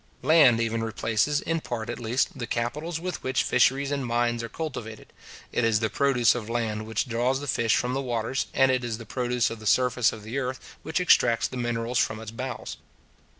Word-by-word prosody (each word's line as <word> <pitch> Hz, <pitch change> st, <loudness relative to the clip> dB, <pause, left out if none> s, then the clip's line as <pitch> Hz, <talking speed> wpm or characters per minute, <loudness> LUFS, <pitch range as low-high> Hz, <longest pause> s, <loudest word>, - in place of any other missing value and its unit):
Land 140 Hz, -5 st, +6 dB
even 115 Hz, 0 st, -1 dB
replaces, 115 Hz, +5 st, 0 dB
in 165 Hz, 0 st, -1 dB
part 115 Hz, -5 st, -4 dB
at 120 Hz, -, -5 dB
least, 120 Hz, +2 st, 0 dB
the 120 Hz, -, -3 dB
capitals 150 Hz, +9 st, -2 dB
with 180 Hz, +1 st, -4 dB
which 130 Hz, 0 st, 0 dB
fisheries 135 Hz, +3 st, +2 dB
and 140 Hz, -1 st, -1 dB
mines 120 Hz, -1 st, 0 dB
are 115 Hz, -, -6 dB
cultivated. 115 Hz, -6 st, -7 dB, 0.4 s
It -, -, 0 dB
is 110 Hz, -2 st, +3 dB
the 110 Hz, -2 st, -1 dB
produce 125 Hz, -5 st, +3 dB
of 115 Hz, -3 st, -5 dB
land 110 Hz, -2 st, -2 dB
which 110 Hz, +3 st, -1 dB
draws 125 Hz, +3 st, 0 dB
the 145 Hz, -, -6 dB
fish 115 Hz, -4 st, +1 dB
from 125 Hz, +1 st, 0 dB
the 135 Hz, -, -1 dB
waters; 120 Hz, 0 st, -2 dB
and 135 Hz, 0 st, +4 dB
it 130 Hz, -1 st, 0 dB
is 115 Hz, -2 st, -3 dB
the 115 Hz, -, -10 dB
produce 125 Hz, 0 st, 0 dB
of 115 Hz, -, -7 dB
the 110 Hz, -, -6 dB
surface 125 Hz, -1 st, +3 dB
of 110 Hz, -, -9 dB
the 115 Hz, +6 st, -3 dB
earth 130 Hz, 0 st, -5 dB
which 160 Hz, -, -2 dB
extracts 120 Hz, -9 st, +4 dB
the -, -, -9 dB
minerals 120 Hz, 0 st, -1 dB
from 110 Hz, -, 0 dB
its 110 Hz, -1 st, -8 dB
bowels. 125 Hz, +2 st, -6 dB
120 Hz, 210 wpm, -26 LUFS, 115-130 Hz, 0.4 s, Land